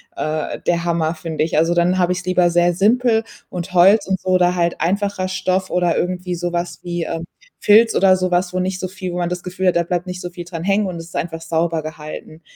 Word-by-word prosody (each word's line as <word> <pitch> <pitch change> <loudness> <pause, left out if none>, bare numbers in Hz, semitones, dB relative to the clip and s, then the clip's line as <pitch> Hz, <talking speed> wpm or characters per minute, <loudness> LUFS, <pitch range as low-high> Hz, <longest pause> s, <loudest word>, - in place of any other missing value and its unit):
äh, 155 0 -3
der 170 -1 +1
Hammer, 165 -1 0
finde 155 -1 -3
ich. 160 - -1
Also, 165 +2 +3
dann 175 +2 +2
habe 180 -1 +2
ich's 180 0 -6
lieber 180 -1 +3
sehr 175 +1 +3
simpel 225 +4 +3 0.3
und 180 0 -6
Holz 190 +5 +6
und 190 -1 0
so, 185 - -4
oder 180 -1 +3
halt 170 -1 0
einfacher 195 +1 0
Stoff, 185 0 -1
oder 175 -2 +1
irgendwie 180 0 -2
so 175 0 -3
was 175 0 -3
wie, 175 -1 -3
ähm, 165 +1 -4 0.4
Filz, 225 +2 +5
oder 190 -1 +5
so 185 0 -1
was, 180 0 +1
wo 185 - -1
nicht 185 0 -2
so 185 - -3
viel 185 -1 -6
wo - - -3
man 175 -1 0
das 180 0 -4
Gefühl 185 +1 -2
hat, 180 - +3
da 170 - +2
bleibt 175 +1 -2
nicht 180 0 -5
so 175 - -5
viel 175 -1 -8
dran 170 -2 -6
hängen 200 +1 +2
und 180 - -5
es 165 - -7
ist - - -13
einfach 165 -1 -4
sauber 165 0 -1
gehalten. 155 +1 -8
180 Hz, 250 wpm, -19 LUFS, 170-185 Hz, 0.4 s, Holz